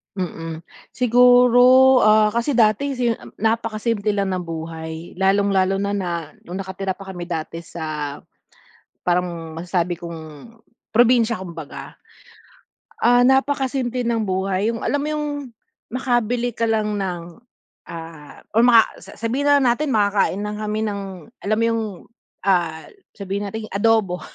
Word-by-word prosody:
Mm, 165 -3 -5 0.3
siguro, 250 +1 +6
ah, 215 0 +5
kasi 235 +5 0
dati 235 +3 +2
si 235 -2 +1 0.2
napakasimple 220 -1 0
lang 200 -2 -1
ng 180 - -3
buhay 160 0 -7
lalong-lalo 195 0 +2
na 180 -6 -3
nung 180 +3 -6
nakatira 190 0 -4
pa 195 +1 -8
kami 175 - -5
dati 165 -1 -5
sa, 155 -4 -5 0.8
parang 175 -2 -1
masasabi 175 0 -1
kong 165 +4 -10 0.4
probinsya 240 -1 +4
kumbaga. 165 -5 -9 1.0
Ah, 245 +1 +5
napakasimple 265 -2 +1
ng 230 -1 0
buhay 190 +1 0
yung 230 -1 -4
alam 285 - 0
mo 295 - -3
yung 300 -1 -2 0.6
makabili 245 -1 0
ka 230 0 -1
lang 215 -1 0
ng, 180 -2 -5 0.5
ah, 165 -3 -10
or 225 - +4
maka 235 -2 +7 0.2
sa - - -13
sabihin 255 +6 -1
na 275 -4 +5
natin 300 +4 -3
makakain 205 -3 +1
lang 210 0 -5
kami 215 +1 -2
ng 200 -2 -3 0.4
alam 215 +2 0
mo 230 - +2
yung 230 -1 0 0.6
ah 170 -5 +1 0.3
sabihin 200 0 -4
nating 220 +2 -6
adobo. 205 -3 +2
210 Hz, 130 wpm, -21 LUFS, 175-235 Hz, 1.0 s, maka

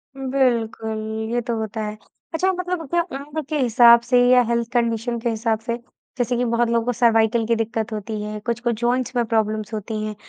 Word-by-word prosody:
उम, 270 -1 -5
बिल्कुल, 230 -4 0 0.4
ये 240 - +1
तो 235 -1 -3
होता 220 0 -4
है। 210 0 -5 0.4
अच्छा 370 +4 +2
मतलब 360 -4 -3
क्या 345 +3 +2
उम्र 290 +3 -5
के 310 - -1
हिसाब 235 -1 +7
से 245 +1 +2
या 250 0 +6
हेल्थ 235 -1 0
कंडीशन 235 0 0
के 235 +1 -1
हिसाब 225 -1 0
से, 235 +1 -3 0.4
जैसे 245 -1 0
कि 245 - +1
बहुत 235 0 +1
लोगों 230 -1 +1
को 245 - +1
सर्वाइकल 225 -1 +3
की 230 - +2
दिक्कत 225 0 -2
होती 215 0 -4
है, 210 0 -5
कुछ 235 +2 -3
को 240 -1 0
जॉइंट्स 240 +2 -1
में 240 - +2
प्रॉब्लम्स 215 -1 -1
होती 215 0 -4
हैं 215 0 -5
235 Hz, 210 wpm, -22 LUFS, 220-245 Hz, 0.4 s, हिसाब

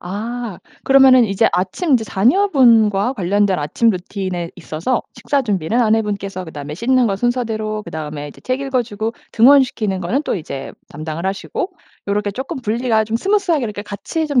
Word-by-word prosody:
아. 220 +3 -5 0.3
그러면은 265 -2 +6
이제 205 +2 +2
아침 200 - 0
이제 230 -3 +2
자녀분과 235 - +3
관련된 195 -1 +1
아침 150 +10 +1
루틴에 180 -2 -4
있어서 170 +8 -2
식사 285 -1 0
준비는 210 0 0
아내분께서 205 -4 0
그다음에 150 -2 -7
씻는 245 +5 +2
거 195 - 0
순서대로 220 -2 -1
그다음에 155 -4 -6
이제 - - -14
책 255 +1 -2
읽어주고 235 -5 -2 0.2
등원시키는 235 -6 +4
거는 225 - -1
또 300 - -2
이제 140 -5 -6 0.2
담당을 155 +3 -6
하시고 195 - -3 0.4
요렇게 205 0 0
쪼끔 265 +4 -5
분리가 225 0 +1
좀 220 +1 -1
스무스 395 - 0
하게 295 -7 +2
이렇게 205 -2 -5
같이 220 +10 -4
좀 285 -4 +2
215 Hz, 390 characters per minute, -18 LUFS, 190-250 Hz, 0.4 s, 그러면은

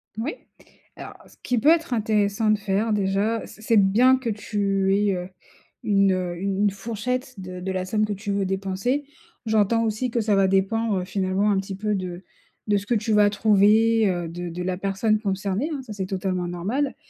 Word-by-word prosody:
Moui. 235 +8 -3 0.6
Alors - - -9
ce - - -20
qui 250 - 0
peut 290 - +4
être 330 -5 +3
intéressant 215 -1 +1
de 215 - +3
faire 210 +2 0
déjà, 205 +3 0
c'est 215 - -14
c'est 225 0 +2
de 200 - +6
bien 250 +7 +4
que 250 -3 -4
tu 200 -2 0
aies, 205 -1 +2
heu, 180 0 -5 0.6
une 195 -2 +3
u 180 -2 -2
une 200 +1 +1
fourchette 235 +4 -4
de 185 -1 -7
de 190 +1 -4
la 185 -1 -2
somme 215 +2 +1
que 210 - -3
tu 200 +1 -5
veux 200 -1 0
dépenser. 195 +9 -2 0.4
J'entends 220 +1 +2
aussi 225 +3 -1
que 235 - 0
ça 210 -1 +1
va 195 -1 +4
dépendre 195 0 +1
finalement 195 +1 0
un 195 - +2
petit 195 0 -5
peu 210 +2 -2
de 180 -1 -5 0.4
de 205 -1 +3
ce 200 - -5
que 235 +3 0
tu 220 +1 0
vas 210 -1 +5
trouver, 215 +1 +4
heu, 175 -2 -2
de 175 +1 -6
de 180 +2 -5
la 180 0 -2
personne 200 +3 0
concernée, 200 - -2
hein, 275 - -4
ça 220 -4 -8
c'est 190 -2 -4
totalement 185 -2 -2
normal. 210 +12 -2
205 Hz, 205 wpm, -24 LUFS, 190-225 Hz, 0.6 s, de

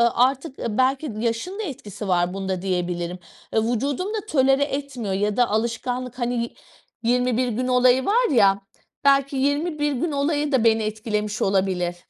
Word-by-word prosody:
artık, 265 +3 +1
belki 260 +5 0
yaşın 235 - -2
da - - -2
etkisi 215 - -7
var 175 -1 +1
bunda 190 -2 -3
diyebilirim, 180 -1 -2 0.3
E, - - +1
vücudum 265 - -1
da 435 -2 -3
tolere 270 -1 +4
etmiyor 275 -7 -3
ya 205 +2 0
da 245 -1 +3
alışkanlık, 245 +3 -2
hani, 240 -1 -1 0.5
21 245 0 +2
bir - - -1
gün 245 +3 -2
olayı 255 +1 +4
var 475 +4 +3
ya, 200 -6 +4 0.4
belki 275 0 +3
21 295 +2 0
gün 305 +6 -1
olayı 290 +1 0
da 260 -5 +3
beni 225 -1 +3
etkilemiş 210 -1 -3
olabilir. 190 -3 +1
245 Hz, 155 wpm, -23 LUFS, 210-275 Hz, 0.5 s, tolere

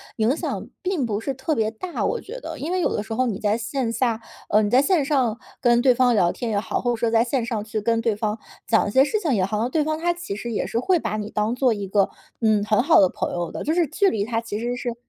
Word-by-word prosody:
影 225 +5 +2
响 - - -3 0.2
并 365 -8 -1
不 210 -3 -2
是 270 +5 -3
特 265 +4 -2
别 220 -1 +1
大， 345 +11 -4
我 470 - -1
觉 470 +5 -8
得。 325 -9 -7
因 295 +5 -4
为 370 - +1
有 355 - 0
的 205 - -2
时 225 - -6
候 255 +3 +1
你 220 -6 -2
在 210 +1 +1
线 235 +1 -2
下， 230 -1 0 0.3
呃， 210 - +4
你 205 - 0
在 255 +5 +5
线 340 -1 +2
上 260 -6 +1 0.2
跟 240 0 +4
对 255 -1 +5
方 245 -1 +3
聊 175 -4 +3
天 240 - -4
也 205 - 0
好， 210 +1 -1
或 245 - 0
者 - - 0
说 230 0 0
在 225 0 +4
线 240 0 0
上 230 -3 -2
去 215 -1 -3
跟 230 +1 +1
对 230 -2 0
方 215 +1 -2 0.3
讲 225 - +2
一 - - -3
些 265 +5 +6
事 425 +9 0
情 325 -9 0
也 195 -5 +2
好， 195 +3 -1
好 215 - 0
像 240 - -1
对 305 +3 +1
方 310 +1 -2
他 345 +1 +1
其 345 - -6
实 235 +2 -5
也 - - -1
是 230 - -1
会 365 +8 +2
把 215 -7 -3
你 210 0 -4
当 215 +1 0
做 250 -2 +3
一 205 -2 -4
个， 195 0 +2 0.3
嗯， 215 -2 +3
很 215 +2 +2
好 315 -2 +5
的 190 - +5
朋 - - -3
友 175 -2 -3
的。 - - -5
就 310 - 0
是 345 0 +3
距 395 +8 +2
离 205 - -1
它 225 +1 -1
其 220 -2 -5
实 240 +2 -2
是 245 -2 -4
235 Hz, 320 characters per minute, -23 LUFS, 215-275 Hz, 0.3 s, 些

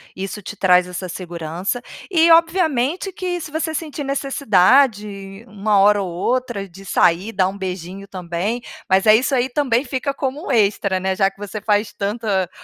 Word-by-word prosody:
isso 195 +2 -5
te 205 - -8
traz 180 -2 +4
essa 180 +1 -5
segurança. 175 +3 -4 0.3
E 335 -3 +4
obviamente 330 0 +2
que 355 -1 -3
se 315 -2 -8
você 320 +1 -2
sentir 305 -2 -4
necessidade 215 -6 +1
uma 210 -1 0
hora 205 +1 +5
ou 190 - -3
outra 235 +2 -2
de 190 +2 -14
sair, 180 +3 +2
dar 190 -3 +2
um 195 - -8
beijinho 190 0 -6
também, 185 +5 -3 0.3
mas 190 0 +3
é 215 0 +7
isso 255 +4 +1
aí 250 0 +1
também 255 -2 +1
fica 260 +1 -2
como 275 +2 -4
extra, 200 -4 +2
né? 190 0 -1
Já 195 0 +3
que 195 - -26
você 205 +1 -6
faz 210 0 0
tanta 200 -2 -1
210 Hz, 170 wpm, -20 LUFS, 190-265 Hz, 0.3 s, é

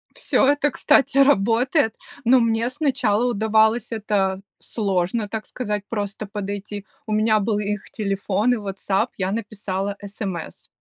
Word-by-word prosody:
Всё - - +2
это, 290 +1 +3
кстати, 275 -1 +3
работает, 240 - +3 0.3
но 255 +2 +6
мне 230 0 +1
сначала 250 -6 +1
удавалось 220 +1 +2
это 200 -3 0 0.2
сложно, 200 0 -1
так 220 +1 -4
сказать, 210 -5 -3
просто 205 -1 -4
подойти. 205 0 -5 0.2
У 215 - -6
меня 215 0 +3
был 210 0 0
их 210 0 -3
телефон 200 +2 0
и - - 0
"Ватсап", 195 -1 -1
я 190 -1 -1
написала 205 -2 -3
смс. 195 -4 -6
215 Hz, 135 wpm, -22 LUFS, 200-230 Hz, 0.3 s, но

